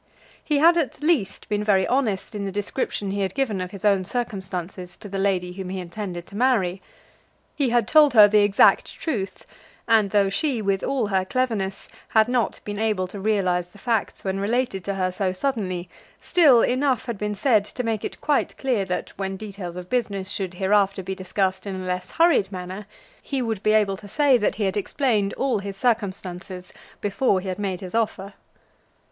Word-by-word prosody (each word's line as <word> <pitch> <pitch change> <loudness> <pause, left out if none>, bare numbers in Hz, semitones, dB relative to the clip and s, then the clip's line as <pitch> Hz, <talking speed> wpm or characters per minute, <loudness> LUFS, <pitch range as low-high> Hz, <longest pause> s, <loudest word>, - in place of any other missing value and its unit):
He 300 - +1
had 335 +4 +6
at 300 -2 -2
least 300 - 0
been 210 0 -1
very 195 -3 +3
honest 235 -8 0
in 205 -1 -4
the 195 - -3
description 205 0 -2
he 200 0 -2
had 190 -1 -2
given 230 -9 0
of 180 - -4
his 200 +1 -8
own 200 -2 +4
circumstances 185 -4 -5
to - - -10
the 195 0 -4
lady 185 -2 0
whom 185 0 -6
he 190 0 -4
intended 175 -1 -6
to 200 - -13
marry. 205 -7 +1 0.7
He 280 -4 +1
had 235 -3 +2
told 300 -4 +5
her 210 -2 +10
the 210 +1 +4
exact 205 -1 +4
truth; 200 - -4 0.4
and 220 -3 +4
though 200 -1 +3
she, 245 +6 0
with 195 -2 0
all 265 -4 0
her 190 -2 +1
cleverness, 205 -3 -2 0.2
had 220 0 +4
not 245 -3 0
been 205 0 -5
able 215 -4 +1
to 200 - -7
realise 190 -4 +1
the 190 - -18
facts 225 0 -1
when 195 0 -2
related 210 -2 -1
to 200 - -2
her 185 -1 0
so 185 0 -1
suddenly, 185 -6 -2 0.3
still 285 -10 +5
enough 260 0 +1
had 235 -5 -4
been 210 0 -2
said 215 -1 +3
to 250 - -5
make 225 -3 -2
it - - -5
quite 295 -2 0
clear 250 -7 0
that, 180 -1 -3
when 190 -1 -3
details 195 -4 -7
of 180 0 -7
business 200 -5 -2
should 185 -3 -4
hereafter 195 0 +2
be 190 - -4
discussed 190 +1 -2
in 195 - -3
a 185 - -6
less 180 0 -3
hurried 330 - +3
manner, 185 +2 -7 0.3
he 275 - -3
would 225 -5 -2
be 215 - +3
able 205 -3 +2
to 205 - -12
say 285 +4 +3
that 210 -4 +1
he 215 - -2
had 190 -1 0
explained 210 -2 0
all 265 -5 0
his 200 -1 -6
circumstances 190 -5 -2 0.3
before 205 0 +1
he 190 - -7
had 185 - -4
made 190 -2 -3
his 185 -2 -8
offer. 210 -3 -1
200 Hz, 200 wpm, -24 LUFS, 190-230 Hz, 0.7 s, her